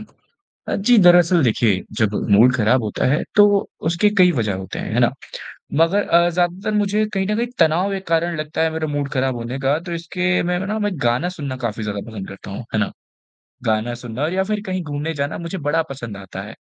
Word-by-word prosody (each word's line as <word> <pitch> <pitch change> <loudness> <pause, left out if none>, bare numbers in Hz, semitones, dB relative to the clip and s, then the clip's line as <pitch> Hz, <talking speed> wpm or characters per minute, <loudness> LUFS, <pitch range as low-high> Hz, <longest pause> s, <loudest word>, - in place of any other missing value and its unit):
अ, - - -17 0.5
जी 230 +4 +3
दरअसल 175 -2 +6
देखिए, 110 -5 +2 0.2
जब 105 -1 +2 0.2
मूड 120 +5 +6
ख़राब 115 +2 +2
होता 105 - -2
है 150 - +1
तो 205 0 +8 0.4
उसके 170 +5 +2
कई 180 -1 +6
वज़ह 110 - -1
होते 95 -1 -6
है, - - -5
हैं - - +2
ना? - - +4 0.7
मगर 195 +5 +1
अ, 170 +1 +4
ज़्यादातर 180 +4 -1
मुझे 210 +1 +1
कहीं 190 -1 0
न 210 - 0
कहीं 240 - 0
तनाव 170 +4 +3
एक 190 0 -6
कारण 165 0 0
लगता 155 +1 -3
है 160 - +2
मेरा 160 0 -2
मूड 145 -1 -2
ख़राब 130 -1 0
होने 120 +3 -5
का 135 +2 +1
तो - - -4
इसके 180 +2 -1
मैंने 180 +2 -1
ना 215 +2 -2
मैं 205 -1 0
गाना 120 +9 +1
सुनना 145 -7 -5
काफ़ी 110 -1 -3
ज़्यादा 100 -1 -3
पसंद 100 -3 -7
करता 95 0 -10
हूँ, 100 - -6
है 110 - +1
ना? 105 - 0 0.7
गाना 110 +2 0
सुनना 120 +2 -5
और 155 +3 0
या 190 +1 +1
फ़िर 210 0 -2
कहीं 185 -1 -2
घूमने 150 +1 -4
जाना 145 +1 -3
मुझे 170 +2 -5
बड़ा 165 +2 +2
पसंद 120 -6 -7
आता 95 -1 -8
है। 115 - -10
160 Hz, 220 wpm, -20 LUFS, 120-180 Hz, 0.7 s, तो